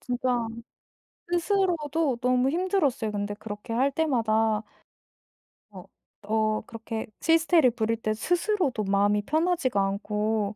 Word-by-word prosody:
진짜 245 -2 -1 0.9
스스로도 330 - +1
너무 250 +1 +2
힘들었어요 325 - 0
근데 205 0 -2
그렇게 210 +2 -7
할 265 +4 +2
때마다. 225 -7 +1 1.1
어 - - -11 0.4
어 215 0 0
그렇게 225 -1 -6 0.2
히스테리를 325 -4 +4
부릴 225 -1 -1
때 215 - 0
스스로도 345 - 0
마음이 200 +1 +2
편하지가 310 - 0
않고 210 +1 -1
240 Hz, 275 characters per minute, -26 LUFS, 215-320 Hz, 1.1 s, 히스테리를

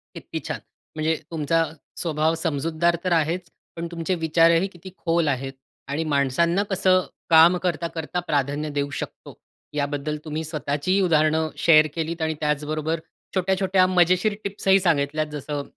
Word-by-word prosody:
किती - - -6
छान. - - -3 0.4
म्हणजे 155 +1 +1 0.2
तुमचा 165 +1 +1 0.3
स्वभाव 160 -1 0
समजूतदार 165 +1 0
तर 185 - -1
आहेच, 170 +2 0 0.3
पण 170 0 -4
तुमचे 170 +2 -2
विचारही 165 +3 +4
किती 185 -1 -12
खोल 165 -1 +1
आहेत 135 -1 -2 0.3
आणि 145 +3 -2
माणसांना 155 +5 +1
कसं 185 -1 +3 0.3
काम 165 +2 +7
करता, 175 -1 -1
करता 165 +1 -4
प्राधान्य 150 -3 -1
देऊ 145 -1 -2
शकतो? - - -7 0.4
याबद्दल 145 +1 -2
तुम्ही 155 +1 -3
स्वतःचीही 155 +4 -1
उदाहरणं 160 -2 +2
शेअर 155 -2 +6
केलीत 165 0 -3
आणि 160 0 0
त्याचबरोबर 150 +2 -1 0.4
छोट्या, 190 0 +2
छोट्या 190 -1 +3
मजेशीर 185 +3 +3
टिप्स 200 0 -5
ही 195 0 +6
सांगितल्यात, 155 -3 +1
जसं 145 0 -4
160 Hz, 145 wpm, -24 LUFS, 150-175 Hz, 0.4 s, काम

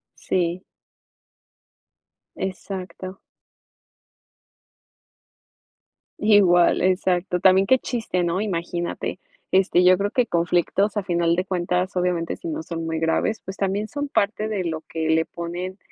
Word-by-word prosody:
Sí. 175 0 -1 1.7
Exacto. 185 0 -6 3.0
Igual, 195 -5 +5
exacto. 180 -1 +1
También 190 +1 +5
qué 260 +3 +5
chiste, 225 -9 -2
¿no?, 175 +2 0
imagínate, 175 -3 -3 0.3
este, 185 -1 +3
yo 185 0 +7
creo 200 +1 -1
que 250 -2 +1
conflictos 175 +4 +1
a 205 - +1
final 170 -2 +1
de 180 - 0
cuentas, 180 +1 -1
obviamente, 180 -2 0
si 340 - -7
no 320 0 -3
son 165 - -5
muy 160 0 -2
graves, 165 +7 0
pues 190 +1 -7
también 200 +2 -1
son 290 +2 -4
parte 215 -2 0
de 200 -4 -2
lo 160 -2 -3
que 160 -1 -3
le 160 0 +3
ponen, 175 +3 -6
185 Hz, 125 wpm, -23 LUFS, 175-200 Hz, 3.0 s, yo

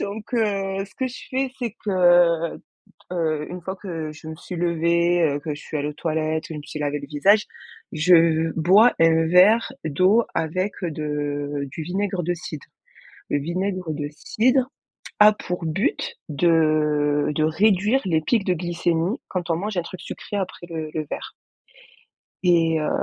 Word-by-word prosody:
Donc, 210 +4 -6
heu, 195 -3 0
ce - - -22
que 260 - -2
je 250 - -7
fais, 265 0 -1
c'est 235 -4 -3
que, 210 - -1
heu, 175 -3 +4
d - - -26 0.5
heu, 155 -3 -1
une 180 0 -7
fois 190 +3 -5
que 165 -6 -5
je 155 +1 -12
me 160 - -6
suis 180 +2 -8
levée, 170 +1 +2
heu, 145 -2 +1
que 150 -1 -4
je - - -11
suis 155 - -5
allée 145 +1 -2
aux - - -7
toilettes, 155 0 -2
je - - -5
me 150 - -6
suis 155 - -7
lavé 145 0 -1
le 140 - -9
visage, 195 +9 +3 0.5
je 165 0 +4
bois 200 +9 +6
un 165 0 +4
verre 195 +7 +5
d'eau 185 +10 +3
avec 185 +5 -1
de 145 -3 -3
du 160 - -5
vinaigre 190 +2 -2
de 175 - 0
cidre. 160 -3 -8 0.7
Le 145 - +2
vinaigre 180 +3 -3
de 145 -1 -4
cidre 250 - +1 0.5
a 210 0 +8
pour 180 -4 -5
but 285 - -1
de 150 -2 +2
de 155 - +1
réduire 205 +9 +2
les 160 -3 +1
pics 210 +5 +1
de 185 - +2
glycémie 175 - -1
quand 180 -2 -4
on 165 - +2
mange 205 +1 -4
un 175 - +2
truc 185 +2 -9
sucré 205 - -6
après 185 -2 -5
le 160 -2 -4
le 155 -1 -3
verre. - - -6 1.1
Et 165 -3 +3
heu 150 - -1
170 Hz, 175 wpm, -23 LUFS, 155-195 Hz, 1.1 s, a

